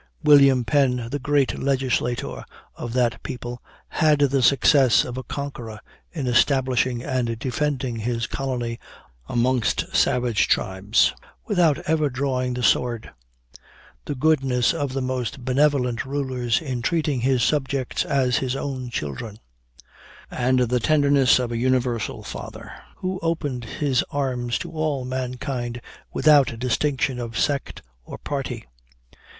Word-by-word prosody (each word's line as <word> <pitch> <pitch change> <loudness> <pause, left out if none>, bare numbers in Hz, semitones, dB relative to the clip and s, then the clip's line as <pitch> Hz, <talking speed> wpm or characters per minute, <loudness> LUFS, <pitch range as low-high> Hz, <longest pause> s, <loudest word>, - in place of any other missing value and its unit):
William 140 -4 +6
Penn, 125 -4 +1
the 145 - -2
great 145 0 +1
Legislator 130 -1 -1 0.3
of 120 -1 -6
that 125 -2 +1
people, 125 -3 -6 0.3
had 155 -1 +2
the 140 -1 +2
success 135 0 +5
of 125 - -6
a 130 - -3
conqueror 120 -6 -6 0.3
in 150 -6 -4
establishing 125 -1 +2
and 125 -4 -1
defending 130 0 -2
his 115 +1 -2
colony 120 -4 -3 0.5
amongst 120 0 0
savage 120 -3 +2
tribes, 95 +4 +2 0.3
without 175 -8 +3
ever 155 -2 +2
drawing 130 -1 -1
the 125 - -3
sword; 120 -2 +1 0.9
the 145 - -3
goodness 135 -3 +2
of 145 -5 -3
the 135 -1 -2
most 130 0 -3
benevolent 130 -3 +2
rulers 130 -3 -1
in 130 -5 -3
treating 150 -1 0
his 130 -1 +2
subjects 135 -3 0
as 130 -3 +1
his 130 +1 -1
own 130 -3 -4
children; 100 - -5 0.9
and 125 0 +1
the 125 0 +1
tenderness 140 -1 +4
of 125 -2 -2
a 115 - -2
universal 125 -2 0
father, - - -8 0.2
who 185 0 -4
opened 145 -7 -2
his 135 +1 0
arms 125 -4 -1
to 170 - -7
all 155 -5 -2
mankind 125 -1 -4 0.3
without 145 -6 +4
distinction 130 +1 0
of 115 -2 -5
sect 140 -2 -1 0.2
or - - -9
party. 140 - -4
130 Hz, 130 wpm, -23 LUFS, 120-140 Hz, 0.9 s, William